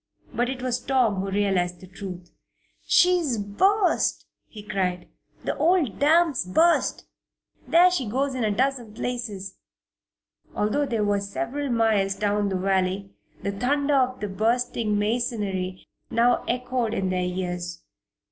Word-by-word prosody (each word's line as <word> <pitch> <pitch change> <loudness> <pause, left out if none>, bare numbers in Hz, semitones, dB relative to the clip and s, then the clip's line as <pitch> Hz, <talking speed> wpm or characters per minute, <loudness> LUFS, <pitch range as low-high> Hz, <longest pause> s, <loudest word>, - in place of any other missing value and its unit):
But 245 +1 0
it 260 -1 -5
was 250 -1 0
Tom 250 -7 +1
who 195 - -3
realized 190 -3 0
the 185 - -12
truth. 185 -2 -9 0.6
"She's 345 -8 +4
burst!" 365 - +1 0.2
he 210 -2 -11
cried. 185 -4 -2 0.4
"The - - -2
old 330 - +2
dam's 315 - +3
burst! 325 - +2 0.6
There 355 +2 +6
she 270 -10 -1
goes 270 +4 0
in 255 -2 -2
a 215 - +2
dozen 245 -1 -1
places!" 215 -7 -4 1.0
Although 275 +8 0
they 230 -4 -1
were 205 -1 +1
several 235 +8 -3
miles 220 -5 +2
down 205 0 0
the 190 - -2
valley, 190 +1 0 0.3
the 200 - -1
thunder 280 +8 0
of 255 -2 +1
the 210 - -2
bursting 220 +1 0
masonry 205 -4 -2 0.2
now 235 +1 +2
echoed 250 -2 -1
in 190 -1 -1
their 185 0 0
ears. 180 -1 -4
215 Hz, 140 wpm, -25 LUFS, 195-255 Hz, 1.0 s, There